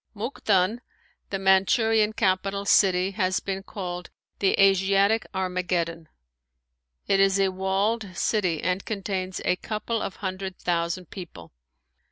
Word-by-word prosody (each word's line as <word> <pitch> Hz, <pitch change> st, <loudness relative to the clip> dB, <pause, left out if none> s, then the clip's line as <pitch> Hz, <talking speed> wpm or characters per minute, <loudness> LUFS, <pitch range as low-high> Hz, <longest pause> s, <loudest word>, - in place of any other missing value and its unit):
Mukden, 210 Hz, -2 st, 0 dB, 0.5 s
the 195 Hz, -, -2 dB
Manchurian 210 Hz, +3 st, +3 dB
capital 195 Hz, -1 st, 0 dB
city, 190 Hz, -1 st, +4 dB
has 185 Hz, -2 st, 0 dB
been 195 Hz, 0 st, -4 dB
called 180 Hz, -3 st, -6 dB, 0.3 s
"The 195 Hz, -, +2 dB
Asiatic 195 Hz, +2 st, +3 dB
Armageddon!" 180 Hz, -3 st, -2 dB, 1.0 s
It 195 Hz, -, +3 dB
is 195 Hz, 0 st, +4 dB
a 195 Hz, -1 st, +3 dB
walled 190 Hz, +1 st, -1 dB
city 180 Hz, -8 st, 0 dB
and 185 Hz, +1 st, 0 dB
contains 190 Hz, -3 st, -3 dB
a 180 Hz, -, +2 dB
couple 220 Hz, +3 st, -3 dB
of 195 Hz, -, -4 dB
hundred 190 Hz, -1 st, -5 dB
thousand 170 Hz, 0 st, -2 dB
people. 175 Hz, -, -10 dB
190 Hz, 120 wpm, -25 LUFS, 185-200 Hz, 1.0 s, city